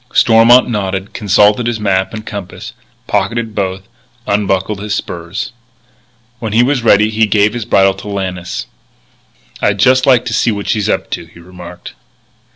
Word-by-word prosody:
Stormont 115 +2 +5
nodded, 95 -3 -3
consulted 105 +3 +2
his 120 -2 -2
map 95 -2 0
and 110 -1 -7
compass, 100 -3 -8 0.3
pocketed 115 -2 -1
both, 95 -2 -3 0.4
unbuckled 100 0 -1
his 105 0 -2
spurs. 85 0 -5 0.9
When 110 -3 -4
he 115 +2 +4
was 135 0 +1
ready 110 -1 +4
he 110 0 +2
gave 105 0 +2
his 120 -3 -4
bridle 95 -4 +3
to 95 +2 -11
Lannis. 95 -3 -4 1.0
"I'd 105 -1 +1
just 130 +6 +3
like 125 -2 +4
to 120 - -3
see 115 - +2
what 100 -2 -3
she's 105 -2 0
up - - -2
to," - - -4
he 85 +1 -18
remarked. 90 0 -11
105 Hz, 160 wpm, -14 LUFS, 95-115 Hz, 1.0 s, Stormont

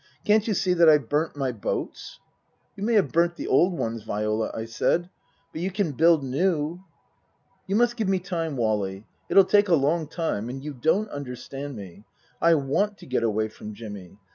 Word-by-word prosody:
" - - -35
Can't 215 0 +3
you 215 - +1
see 185 -1 +1
that 170 -2 +6
I've 150 -6 +4
burnt 150 +2 0
my 135 -3 -1
boats? 115 -4 -5 0.2
" - - -46
" - - -43
You - - -11
may 230 +2 +1
have 190 -11 +3
burnt 170 +1 +2
the - - -6
old 180 0 +3
ones, 115 0 -3
Viola," 105 +1 -1
I 110 - -5
said. 175 +10 0 0.2
" - - -41
But 160 - -5
you 185 - -1
can 195 -4 -1
build 160 +1 +4
new." 155 +4 0 0.4
" - - -42
You 195 - 0
must 240 +2 +2
give 215 -4 0
me 190 - +3
time, 165 -5 -3
Wally. 105 -3 -1 0.2
It'll 195 - +6
take 205 +1 +4
along 160 -1 +2
time. 160 - -3
And 135 +2 -6
you 150 0 -5
don't 160 - +1
understand 140 0 -6
me. 100 -1 -10 0.4
I 170 0 +5
want 180 +9 0
to - - -13
get 130 - -1
away 110 -1 0
from 105 0 -10
Jimmy. 100 -4 -9
150 Hz, 210 wpm, -25 LUFS, 115-180 Hz, 0.4 s, that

